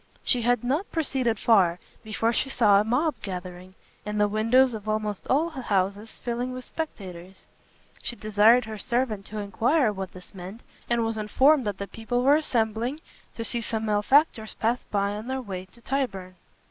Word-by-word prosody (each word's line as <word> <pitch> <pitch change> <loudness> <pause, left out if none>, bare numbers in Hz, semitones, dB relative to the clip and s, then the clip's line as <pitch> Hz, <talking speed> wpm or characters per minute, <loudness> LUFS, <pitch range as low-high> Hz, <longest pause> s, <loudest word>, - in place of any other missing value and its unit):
She 245 - +2
had 245 +1 +2
not 285 +11 -1
proceeded 265 -8 0
far, 190 -6 +4 0.3
before 220 +2 0
she 270 - 0
saw 205 -6 +5
a - - 0
mob 255 +8 +1
gathering, 185 -1 -7 0.3
and 210 0 -3
the 210 - +4
windows 230 +5 +3
of 215 -1 -6
almost 215 -2 -2
all 315 +6 +2
the 270 -4 -6
houses 200 0 -1
filling 245 +1 -2
with 255 -1 -7
spectators. 190 - -7 0.6
She 240 - -3
desired 215 +3 +4
her 220 -1 -7
servant 235 -3 -1
to 215 - -7
enquire 220 +5 +1
what 190 -2 -6
this 185 0 -13
meant, 190 +5 -9 0.3
and 235 -1 +2
was 225 -1 -2
informed 260 +5 +3
that 205 - -2
the 200 - -4
people 235 +4 -2
were 280 +3 +6
assembling 240 -2 0 0.4
to 230 - -4
see 235 +2 0
some 220 0 -2
malefactors 220 +2 +2
pass 235 +2 0
by 200 -1 0
in 210 +3 -6
their 265 0 -2
way 190 -7 -6
to 235 +5 -19
Tyburn. 200 -10 -3
220 Hz, 180 wpm, -26 LUFS, 205-250 Hz, 0.6 s, were